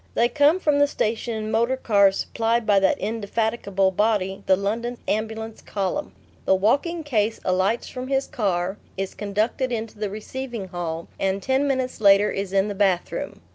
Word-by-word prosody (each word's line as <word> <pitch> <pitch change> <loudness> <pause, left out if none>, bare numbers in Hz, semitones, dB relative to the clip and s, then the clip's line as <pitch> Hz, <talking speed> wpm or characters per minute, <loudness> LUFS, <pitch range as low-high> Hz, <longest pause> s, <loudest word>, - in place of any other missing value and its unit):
They 235 +1 +3
come 295 +6 +4
from 295 -5 +2
the 285 - +5
station 230 -3 -2
in 215 0 -4
motor 235 +4 +2
cars 200 -5 +4
supplied 230 0 0
by 205 -2 +4
that 190 -1 +2
indefatigable 210 -2 0
body, 200 -1 0
the 190 - +6
London 230 +5 -2
Ambulance 220 +1 -3
Column. 200 +9 -3 0.3
The 190 - +4
walking 285 - +1
case 225 -6 0
alights 190 +5 +1
from 255 0 -6
his 270 0 +1
car, 190 -3 -1 0.2
is 195 0 -3
conducted 215 +5 -1
into 225 -2 -4
the 210 -1 -1
receiving 220 0 -6
hall, 170 -2 -4
and 195 0 0
ten 265 +6 +1
minutes 260 -3 -1
later 200 0 +6
is 195 -1 -3
in 195 +1 +2
the 205 - -3
bathroom. 190 -3 -1
215 Hz, 170 wpm, -24 LUFS, 195-240 Hz, 0.3 s, the